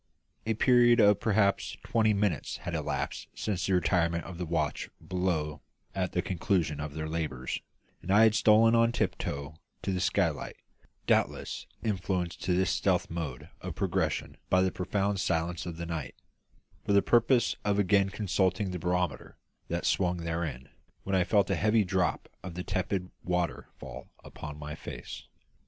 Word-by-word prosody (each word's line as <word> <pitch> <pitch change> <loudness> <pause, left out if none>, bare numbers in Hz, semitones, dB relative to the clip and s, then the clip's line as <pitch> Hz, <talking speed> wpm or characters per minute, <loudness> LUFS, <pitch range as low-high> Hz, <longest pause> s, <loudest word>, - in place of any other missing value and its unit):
A 110 - +1
period 120 0 +5
of 105 -2 +6
perhaps 100 -2 +1
twenty 110 -1 +2
minutes 100 -7 0
had - - -6
elapsed - - -3
since 95 -4 -2
the 95 - +3
retirement 85 -2 +1
of 90 -2 -9
the 90 - -3
watch 80 -2 -1 0.2
below 85 -5 -1 0.3
at 95 -2 -2
the 90 - 0
conclusion 85 -5 0
of 75 0 -5
their 80 0 -3
labours, 75 -6 -3 0.4
and - - -10
I 105 +3 +6
had 110 -1 +6
stolen 110 +1 +5
on 115 0 +4
tiptoe 70 -9 -2 0.3
to - - -1
the 90 - -1
skylight - - 0 0.5
doubtless - - 0 0.2
influenced 95 -4 -1
to 90 -1 +2
this 95 0 +2
stealthy 90 -3 +1
mode 75 -8 -5
of - - -5
progression - - -1
by 95 0 +4
the 95 - +1
profound 100 +2 -1
silence 85 0 -1
of 85 -2 -5
the 85 - -4
night 80 -6 -4 0.7
for 100 - 0
the 100 - +5
purpose 120 0 +3
of 105 -1 +1
again 100 0 +3
consulting 95 -1 0
the 90 - -4
barometer 90 -5 -2 0.3
that - - -2
swung 90 -2 +2
therein, 80 -6 -3 0.3
when 95 - -1
I 95 - +4
felt 100 +3 +2
a - - +3
heavy 110 0 +3
drop 90 -2 0
of 90 -2 -7
tepid 95 0 -2
water 90 -2 -1
fall 65 -1 -9
upon 75 -1 -8
my 75 0 -6
face. 80 - -8
90 Hz, 160 wpm, -29 LUFS, 85-100 Hz, 0.7 s, of